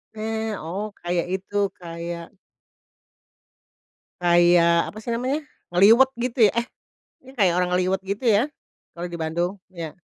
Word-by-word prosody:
Oke, 215 - -7 0.4
oh 185 +6 -4 0.2
kayak 175 -1 0
itu, 195 +2 -9 0.2
kayak 170 0 -6 2.0
kayak 175 -1 +4
apa - - -11
sih 230 +2 -4
namanya 265 +6 -2 0.2
ngeliwet 220 +9 +6
gitu 235 -3 +3
ya? - - -3
Eh 235 - +1 0.6
ini 265 - -14
kayak 190 -6 +3
orang 180 0 +1
ngeliwet 185 +1 +1
gitu 200 +5 -5
ya, 225 +2 +4 0.5
kalau 175 +1 -4
di 170 - -5
Bandung? 175 +5 -2
Iya. 170 -4 -7
185 Hz, 135 wpm, -23 LUFS, 170-220 Hz, 2.0 s, ngeliwet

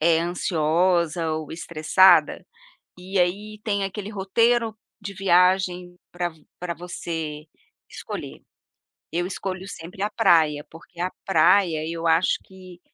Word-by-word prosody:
eh, 165 +1 +4
ansiosa 170 -1 +1
ou 155 -1 -6
estressada, 170 +3 +3 0.5
e 185 +2 -4
aí 205 +4 -1
tem 200 -2 0
aquele 195 +1 -4
roteiro 225 +3 +1 0.3
de 205 -1 -6
viagem 180 -1 +2 0.2
pra 175 -1 -3 0.3
pra 180 -1 -3
você 160 -2 -6 0.4
escolher. - - -7 0.7
Eu 175 +2 -1
escolho 190 0 -5
sempre 180 +2 -7
a 210 - -1
praia, 160 -9 +3
porque 170 +1 -15
a 185 - -1
praia 185 -5 +3
eu 165 0 -5
acho 165 +2 +3
que 185 -2 -14
180 Hz, 120 wpm, -24 LUFS, 165-195 Hz, 0.7 s, eh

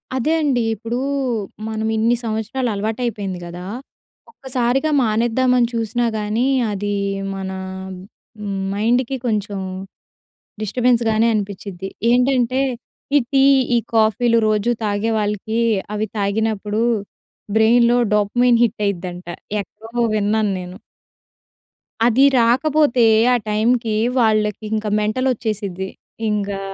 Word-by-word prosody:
అదే 260 +5 0
అండి. 265 -5 +1
ఇప్పుడు 230 +3 -4 0.7
మనం 220 0 -3
ఇన్ని 230 +2 +3
సంవత్సరాలు 225 +3 -2
అలవాటు 215 +3 -3
అయిపోయింది 200 -5 -3
కదా! 175 +1 -8 0.7
ఒక్కసారిగా 265 - -1
మానేద్దామని 240 +2 +2
చూసినా 230 +1 -1
కానీ 215 +4 0 0.3
అది 205 0 -3 0.4
మన 190 0 -5 1.2
మైండ్‍కి 240 +5 +1
కొంచెం 210 -3 -1 1.0
డిస్టర్బెన్స్‌ 240 +2 +1
గానే 220 +2 +3
అనిపించిద్ది. 195 -2 -5 0.2
ఏంటంటే 255 0 +2 0.6
ఈ - - +6
టీ, 270 0 +5 0.3
ఈ - - +4 0.2
కాఫీలు 230 +2 +3
రోజూ 215 +2 +1
తాగే 210 +2 0
వాళ్ళకి 210 +2 -2 0.4
అవి 215 +1 -1
తాగినప్పుడు 210 +1 -1 0.8
బ్రెయిన్‌లో 235 +2 +4 0.2
డోపమైన్ 230 +4 +3
హిట్ 225 -2 -1
అయిద్దంట. 180 -2 -4 0.4
ఎక్కడో 225 +3 -13 0.2
విన్నాను 210 0 +1
నేను. 180 +1 -8 1.3
అది 245 +3 +4 0.2
రాకపోతే 255 +1 +3 0.3
ఆ - - +4
టైమ్‌కి 225 +1 +1 0.2
వాళ్ళకి 215 -2 +1
ఇంకా 215 -1 -1
మెంటల్ 215 +5 0
వచ్చేసిద్ది. 200 -5 -4 0.4
ఇంకా 200 -1 -2
220 Hz, 105 wpm, -20 LUFS, 205-240 Hz, 1.3 s, ఈ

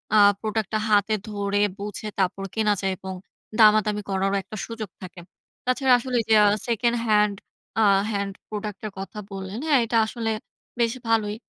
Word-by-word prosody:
আ - - +7 0.2
product 215 -1 -2
টা 215 - +2
হাতে 205 +1 +3 0.2
ধরে 205 -1 -1 0.2
বুঝে 205 +1 -6
তারপর 190 +1 0
কেনা 215 -2 +2
যায় 195 -1 0
এবং 190 0 -6 0.5
দামাদামি 210 -1 +5
করারও 195 +1 0
একটা 215 - -9
সুযোগ 225 -3 -6
থাকে। 185 -1 -9 0.5
তাছাড়া 255 +1 +3
আসলে 255 +1 -4
ওইযে 220 0 +3
আ - - +6 0.2
সেকেন্ড 235 +1 +1
হ্যান্ড 210 -2 +3 0.5
আ - - +5 0.3
হ্যান্ড 200 -1 -2 0.2
প্রোডাক্ট 210 -1 -5
এর - - -7
কথা 195 +2 -7
বললেন। 195 +3 -6
হ্যাঁ, 295 -4 +4
এটা 230 0 0
আসলে 225 0 -3 0.5
বেশ 230 -1 +2
ভালোই। 215 -2 +1
210 Hz, 165 wpm, -24 LUFS, 200-225 Hz, 0.5 s, আ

